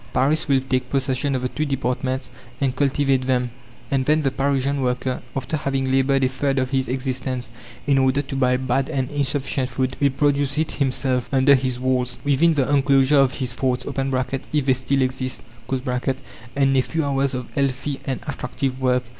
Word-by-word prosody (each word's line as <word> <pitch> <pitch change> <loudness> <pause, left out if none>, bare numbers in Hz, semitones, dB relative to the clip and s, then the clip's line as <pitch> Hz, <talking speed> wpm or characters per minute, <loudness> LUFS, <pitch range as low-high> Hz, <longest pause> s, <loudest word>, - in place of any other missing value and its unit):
Paris 150 +5 +2
will 135 -2 +3
take 130 -1 -1
possession 135 0 0
of 130 - -2
the 125 - 0
two 155 - -2
departments 130 -1 -2 0.3
and 135 -2 0
cultivate 135 -1 +1
them. 125 -2 +1 0.4
And 135 -1 +2
then 155 +1 +3
the 135 - +1
Parisian 140 +1 0
worker, 125 0 -1
after 135 +3 -2
having 135 -2 -1
laboured 135 0 +3
a - - +4
third 135 +1 -1
of 130 0 0
his 130 -1 +1
existence 130 -2 -3 0.3
in 140 -1 +3
order 130 +2 +2
to 135 0 -6
buy 125 -2 +2
bad 130 +2 0
and 135 -4 -2
insufficient 140 -2 -1
food, 130 0 -1
will 140 - +5
produce 140 +1 +1
it 155 0 0
himself, 130 -2 0
under 135 +1 +5
his 130 -2 +1
walls, 125 -1 0
within 150 +3 +3
the 135 -3 +1
enclosure 140 0 +4
of 135 -1 +3
his 125 -3 -2
forts 125 -1 -1
(if 135 +1 -1
they 130 - +4
still 130 +1 +1
exist), 130 0 -3 0.3
and 130 -1 -1 0.4
in 135 -1 +3
a 130 - +5
few 160 +3 -2
hours 135 -1 0
of 125 -2 -6
healthy 135 0 -1
and 130 -2 -3
attractive 135 -2 -3
work. 125 -1 +2
135 Hz, 185 wpm, -22 LUFS, 130-140 Hz, 0.4 s, will